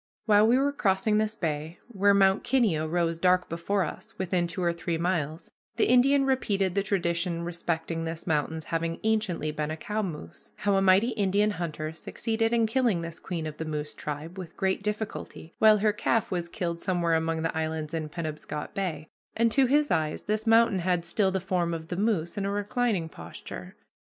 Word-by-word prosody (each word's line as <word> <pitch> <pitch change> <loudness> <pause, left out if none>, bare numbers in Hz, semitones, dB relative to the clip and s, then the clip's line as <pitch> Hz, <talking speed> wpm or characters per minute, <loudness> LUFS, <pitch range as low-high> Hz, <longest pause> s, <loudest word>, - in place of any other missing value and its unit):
While 210 -1 +5
we 240 +3 +5
were 280 +2 +2
crossing 210 -4 +1
this 215 0 -1
bay, 160 -3 -3
where 200 -2 +3
Mount 195 0 +4
Kineo 220 -12 +2
rose 165 -1 0
dark 180 0 +3
before 185 +4 0
us 190 +7 -8
within 180 -2 0
two 170 +2 -3
or 170 -1 +2
three 170 0 -2
miles, 165 -2 -2 0.2
the 225 - +3
Indian 270 +3 +5
repeated 200 -8 +1
the 200 - +2
tradition 170 -3 -1
respecting 165 -1 -2
this 165 0 -5
mountain's 160 0 -1
having 165 +1 -2
anciently 215 -8 0
been 150 0 -3
a 155 - -4
cow 210 +6 -2
moose 170 -7 -7
how 205 -1 0
a 195 - +3
mighty 195 +5 +5
Indian 205 -1 +1
hunter 155 -4 -4
succeeded 225 +7 -2
in 230 -1 +3
killing 225 -6 +1
this 165 0 -6
queen 170 -3 -4
of 155 -1 -6
the - - -3
moose 150 -1 -4
tribe 150 +5 -6
with 175 -3 -9
great 190 0 0
difficulty, 210 -5 -5
while 215 -1 +7
her 210 0 +2
calf 220 +1 0
was 175 -2 -2
killed 170 -4 -3
somewhere 175 -3 +1
among 160 0 0
the 165 - -1
islands 160 -1 -2
in 155 -2 -3
Penobscot 155 0 -5
Bay, 170 -7 -3 0.3
and, 230 0 +3
to 270 +2 +4
his 290 +3 +2
eyes, 155 -1 0
this 215 +2 -2
mountain 225 -3 +5
had 175 -1 0
still 190 +3 +2
the 190 0 -1
form 175 -2 -1
of 160 0 -8
the 180 - -2
moose 195 -3 0
in 195 - -1
a - - -1
reclining 205 -2 0
posture. 160 - -9
180 Hz, 195 wpm, -27 LUFS, 165-210 Hz, 0.3 s, while